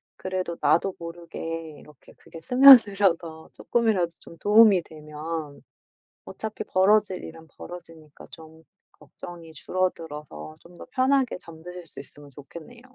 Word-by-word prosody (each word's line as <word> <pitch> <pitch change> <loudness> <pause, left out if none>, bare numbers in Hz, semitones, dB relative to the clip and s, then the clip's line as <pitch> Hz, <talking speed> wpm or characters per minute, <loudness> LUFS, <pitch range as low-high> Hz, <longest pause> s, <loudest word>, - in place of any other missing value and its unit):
그래도 185 -2 -4
나도 165 +6 +2
모르게 165 -1 -7
이렇게 150 +2 -18
그게 165 - -14
스며들어서 200 -9 +5
쪼끔이라도 220 -7 0
좀 165 - -14
도움이 210 -3 +5
되면 155 -1 -8 0.6
어차피 220 -1 -7
벌어질 195 0 +2
일은 160 0 -11
벌어지니까 165 -4 -12
좀 160 0 -15 0.3
걱정이 170 -2 -13
줄어들어서 150 - -5
좀 175 +1 -18
더 - - -11
편하게 265 -2 +1
잠드실 175 +1 -12
수 - - -11
있으면 145 -1 -15
좋겠네요. 165 - -13
170 Hz, 310 characters per minute, -25 LUFS, 160-195 Hz, 0.6 s, 스며들어서